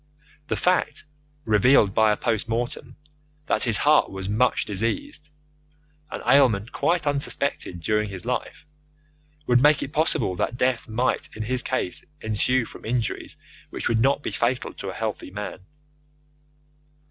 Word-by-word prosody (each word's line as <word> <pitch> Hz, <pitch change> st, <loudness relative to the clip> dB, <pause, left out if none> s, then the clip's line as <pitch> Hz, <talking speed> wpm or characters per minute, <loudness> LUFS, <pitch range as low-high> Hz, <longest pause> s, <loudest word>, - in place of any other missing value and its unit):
The -, -, -1 dB
fact, 180 Hz, -5 st, +1 dB, 0.4 s
revealed 105 Hz, -1 st, +4 dB
by 110 Hz, 0 st, +4 dB
a 105 Hz, -, 0 dB
post 115 Hz, -1 st, -1 dB
mortem, 120 Hz, +3 st, -3 dB, 0.5 s
that -, -, +2 dB
his 115 Hz, -3 st, +4 dB
heart 150 Hz, +1 st, +4 dB
was 95 Hz, -1 st, -6 dB
much 110 Hz, +5 st, +1 dB
diseased 150 Hz, -, -3 dB, 0.8 s
an -, -, -6 dB
ailment 120 Hz, -6 st, +4 dB
quite 170 Hz, -1 st, 0 dB
unsuspected 140 Hz, -9 st, -1 dB
during 105 Hz, +5 st, 0 dB
his 95 Hz, +1 st, -6 dB
life 125 Hz, +5 st, -4 dB, 0.8 s
would 125 Hz, 0 st, +4 dB
make 150 Hz, +2 st, +4 dB
it 140 Hz, -, -7 dB
possible 155 Hz, -, +1 dB
that 120 Hz, -, -2 dB
death 125 Hz, -2 st, 0 dB
might 120 Hz, +3 st, 0 dB
in 110 Hz, -, -4 dB
his 125 Hz, +3 st, 0 dB
case 125 Hz, -9 st, 0 dB, 0.2 s
ensue 115 Hz, +3 st, +1 dB
from -, -, -12 dB
injuries 115 Hz, 0 st, -2 dB, 0.3 s
which -, -, -4 dB
would 115 Hz, -, +1 dB
not 140 Hz, +4 st, +2 dB
be -, -, -3 dB
fatal 125 Hz, +2 st, -1 dB
to 95 Hz, -, -6 dB
a -, -, -5 dB
healthy 110 Hz, -4 st, -4 dB
man. 105 Hz, 0 st, -6 dB
120 Hz, 145 wpm, -24 LUFS, 105-135 Hz, 0.8 s, revealed